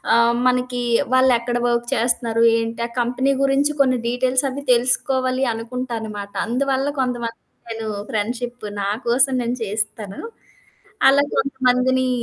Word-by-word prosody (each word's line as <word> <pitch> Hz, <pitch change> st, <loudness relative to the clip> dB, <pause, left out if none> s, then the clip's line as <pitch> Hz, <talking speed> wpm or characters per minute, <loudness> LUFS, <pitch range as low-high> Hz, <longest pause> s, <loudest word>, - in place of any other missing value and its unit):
ఆహ్, 235 Hz, 0 st, +4 dB
మనకి 250 Hz, 0 st, +1 dB, 0.3 s
వాళ్ళెక్కడ 245 Hz, -2 st, +3 dB
వర్క్ 240 Hz, 0 st, 0 dB
చేస్తున్నారు, 230 Hz, -1 st, 0 dB, 0.2 s
ఏంటి? 230 Hz, +1 st, -4 dB
ఆ -, -, -11 dB
కంపెనీ 250 Hz, +3 st, +1 dB
గురించి 275 Hz, +2 st, +2 dB
కొన్ని 255 Hz, -2 st, +4 dB
డీటెయిల్స్ 255 Hz, +2 st, +1 dB
అవి 280 Hz, +2 st, -6 dB
తెలుసుకోవాలి 255 Hz, +1 st, +1 dB
అనుకుంటనమాట. 225 Hz, -3 st, -5 dB
అందువల్ల 270 Hz, +3 st, 0 dB
కొంతమంది 240 Hz, -3 st, -2 dB, 0.3 s
నేను 225 Hz, -1 st, -4 dB, 0.2 s
ఫ్రెండ్షిప్ 240 Hz, +2 st, -3 dB, 0.2 s
నా 200 Hz, -, -1 dB, 0.2 s
కోసం 260 Hz, +3 st, +3 dB
నేను 240 Hz, +1 st, -2 dB
చేస్తాను. 210 Hz, -1 st, -4 dB, 0.9 s
అలా 285 Hz, +1 st, +4 dB
కొంతమందిని 260 Hz, -1 st, +1 dB
245 Hz, 120 wpm, -21 LUFS, 230-260 Hz, 0.9 s, ఆహ్